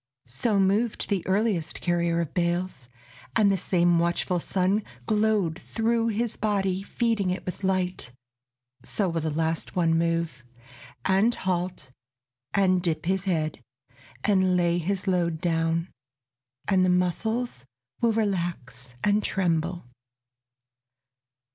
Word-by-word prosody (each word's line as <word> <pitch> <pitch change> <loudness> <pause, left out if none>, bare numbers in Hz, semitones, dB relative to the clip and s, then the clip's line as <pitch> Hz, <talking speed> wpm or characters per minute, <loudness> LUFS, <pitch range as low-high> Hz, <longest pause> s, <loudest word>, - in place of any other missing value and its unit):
So 195 - 0
moved 205 +4 +1
the 195 -3 +2
earliest 190 -4 0
carrier 170 -1 +1
of 160 -3 -5
bales, 175 -7 -1 0.5
And 210 -3 +5
the - - +3
same 175 -2 +2
watchful 170 +1 0
sun 190 +4 0 0.2
Glowed 210 -6 +1
through 230 0 0
his 230 +1 -1
body 195 -3 0
feeding 220 -2 0
it 180 - -3
with 185 +2 -6
light. 185 -7 -1 0.7
So 195 +9 -1
will 165 -1 -1
the 160 - -1
last 160 +2 -2
one 165 -2 +3
move, 165 -5 0 0.6
And 200 +5 +3
halt, 180 -6 -3 0.6
and 185 -2 +3
dip 165 -3 -1
his 190 +2 0
head, 155 -6 -1 0.6
and 190 -3 +3
lay 175 0 +2
his 190 +3 -2
load 170 -3 +1
Down, 165 0 0 0.8
and 190 -2 +4
the 185 - +3
muscles 180 - 0 0.4
will 235 - +4
relax 170 - -2
and 210 +1 +3
tremble. 175 -2 0
180 Hz, 125 wpm, -26 LUFS, 170-200 Hz, 0.8 s, And